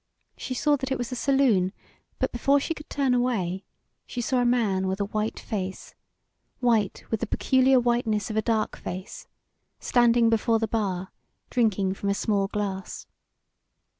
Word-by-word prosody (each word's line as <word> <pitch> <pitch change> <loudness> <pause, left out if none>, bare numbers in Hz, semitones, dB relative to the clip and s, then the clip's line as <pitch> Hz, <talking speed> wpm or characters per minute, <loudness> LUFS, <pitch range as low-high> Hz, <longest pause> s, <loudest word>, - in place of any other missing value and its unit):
She 255 - -5
saw 295 +3 +2
that 265 0 -5
it 265 - +1
was 245 +1 -4
a - - -2
saloon, 240 -9 +2 0.4
but - - -1
before 275 +4 +3
she 305 - -2
could 300 -1 -12
turn 275 -3 +1
away 200 -7 0 0.4
she 245 - -5
saw 250 +2 +1
a 245 - +2
man 210 -6 +2
with 190 +1 -2
a 200 - 0
white 215 +2 -2
face 190 -3 -5 0.7
white 225 -6 +1
with 225 - 0
the 235 - -2
peculiar 260 +3 +3
whiteness 235 -3 0
of - - -5
a 220 - +2
dark 220 -1 0
face, 185 +2 -7 0.5
standing 240 -1 +4
before 225 0 +2
the 225 0 -1
bar 190 -5 -2 0.4
drinking 205 -6 +1
from 200 +1 -3
a 200 - +1
small 200 -1 0
glass. 195 -2 -4
225 Hz, 165 wpm, -26 LUFS, 200-250 Hz, 0.7 s, standing